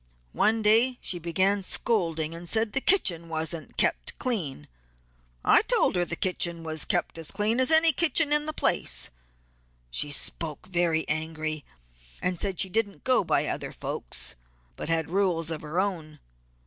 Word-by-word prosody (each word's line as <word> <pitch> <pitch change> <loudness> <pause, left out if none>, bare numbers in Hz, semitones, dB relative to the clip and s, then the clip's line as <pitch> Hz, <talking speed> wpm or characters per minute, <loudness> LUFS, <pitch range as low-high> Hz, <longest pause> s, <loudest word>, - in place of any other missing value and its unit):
One 220 +1 +2
day 230 +4 +4
she 175 - 0
began 190 +4 +1
scolding 165 -6 0
and 170 +1 -7
said 220 -1 0
the 270 - +1
kitchen 170 - +2
wasn't 160 -1 -4
kept - - 0
clean. 175 - -2 0.8
I - - +6
told - - +2
her 180 - +2
the 175 - -4
kitchen 170 -2 -1
was 160 -1 -3
kept 175 -3 -1
as 160 - -5
clean 215 +4 0
as 260 - +3
any 320 0 +6
kitchen 320 -1 +3
in 295 0 +2
the - - +2
place; - - 0 0.8
she 145 - +3
spoke 155 +2 -2
very 170 -3 0
angry, 155 -1 -3 0.6
and 180 -1 -2
said 195 -4 -3
she 190 - +3
didn't 205 0 -2
go 255 -4 +3
by - - +1
other - - -4
folks - - -3 0.4
but - - -6
she 165 - +1
had 160 0 -1
rules 175 -4 0
of 155 - -4
her 155 +4 -3
own. 165 -6 -3
175 Hz, 165 wpm, -27 LUFS, 160-220 Hz, 0.8 s, I